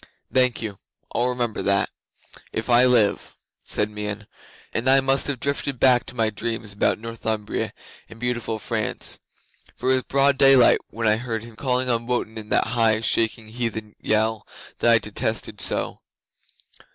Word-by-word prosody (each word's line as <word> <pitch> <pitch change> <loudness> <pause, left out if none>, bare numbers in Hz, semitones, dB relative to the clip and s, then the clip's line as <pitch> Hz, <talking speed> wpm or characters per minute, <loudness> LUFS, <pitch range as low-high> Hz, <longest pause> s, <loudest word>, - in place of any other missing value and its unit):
'"Thank 125 -2 +2
you. 100 -3 -6 0.3
I'll 125 - +1
remember 120 -3 -2
that, 100 0 +1 0.6
if 115 +2 -3
I 120 +1 +7
live," 120 -5 +2 0.3
said 105 0 -1
Meon, 105 0 -5 0.5
and 120 +3 +1
I 135 +1 +6
must 135 0 +2
have 140 -4 -1
drifted 140 -1 -2
back 125 -2 +4
to 125 - -9
my 110 -2 +1
dreams 110 0 -4
about 100 - +1
Northumbria 110 -1 -3 0.4
and 110 - -13
beautiful 120 -2 -2
France, 110 -1 -2 0.6
for 130 - 0
it - - +6
was 130 -1 +2
broad 140 0 +2
daylight 135 -3 +6
when 115 +1 -4
I 105 0 +4
heard 115 -2 -4
him 115 -1 -12
calling 125 0 0
on 115 -1 0
Wotan 115 -3 -2
in 105 -1 -10
that - - +2
high, 110 -2 +3
shaking 115 0 0
heathen 110 -2 -4
yell 110 0 0 0.3
that 120 - +3
I 115 - +7
detest 110 +1 -2 0.2
so. - - 0
115 Hz, 165 wpm, -23 LUFS, 110-125 Hz, 0.6 s, I